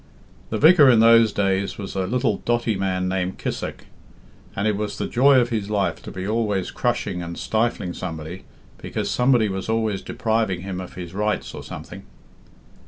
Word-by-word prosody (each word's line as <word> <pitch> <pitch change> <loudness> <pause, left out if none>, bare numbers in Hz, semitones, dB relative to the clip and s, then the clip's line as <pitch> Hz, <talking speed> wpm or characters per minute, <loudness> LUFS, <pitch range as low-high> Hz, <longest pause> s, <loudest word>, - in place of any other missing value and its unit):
"The - - -2
vicar 155 -3 +7
in 120 -3 +6
those 115 -1 +6
days 100 -1 0
was 100 -2 -6
a 95 -1 -1
little 115 -3 0
dotty 120 -2 0
man 95 -1 -1
named 95 0 -2
Kissack, - - -5 0.7
and 100 +2 0
it 105 - +1
was 105 +1 -4
the - - -2
joy 135 +2 +5
of 120 -1 +1
his 105 -4 -2
life 105 -2 -1
to - - -9
be 95 +1 -5
always 105 -4 -1
crushing 90 - -1
and 85 0 -6
stifling 110 -5 -1
somebody, 80 0 -6 0.4
because - - -3
somebody 125 -3 +3
was 95 +1 -4
always 110 -3 0
depriving 110 -5 -1
him 95 -1 -5
of 90 - -10
his 90 -1 -7
rights 105 +2 -2
or - - -7
something." - - -9
105 Hz, 175 wpm, -23 LUFS, 95-115 Hz, 0.7 s, vicar